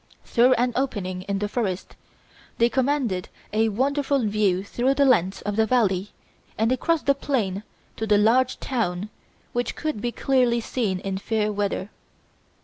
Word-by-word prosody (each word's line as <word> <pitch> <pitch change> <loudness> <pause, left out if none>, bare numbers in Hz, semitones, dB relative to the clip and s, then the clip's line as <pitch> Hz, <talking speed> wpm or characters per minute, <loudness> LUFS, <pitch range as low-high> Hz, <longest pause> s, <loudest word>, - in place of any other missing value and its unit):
Through 250 +2 +4
an 245 +1 +1
opening 200 -9 -2
in 200 - 0
the 205 +1 -1
forest, 200 -5 -3 0.6
they 235 +1 +4
commanded 255 -8 0 0.2
a 220 +1 +3
wonderful 275 +3 0
view 200 -3 +1
through 250 +6 0
the 280 0 +4
length 195 -8 +2
of 205 0 -3
the 220 0 +3
valley 205 -5 +1 0.5
and 225 +2 +2
across 315 +5 +1
the 280 - +4
plain 225 -9 -1 0.4
to 220 - -3
the 210 -1 +4
large 245 +5 +3
town 210 -6 -2 0.4
which 245 0 -1
could 305 -9 -3
be 240 - -1
clearly 250 -2 +2
seen 220 -4 -1
in 195 -1 -3
fair 215 0 -1
weather. 200 -1 -2
225 Hz, 155 wpm, -24 LUFS, 200-255 Hz, 0.6 s, Through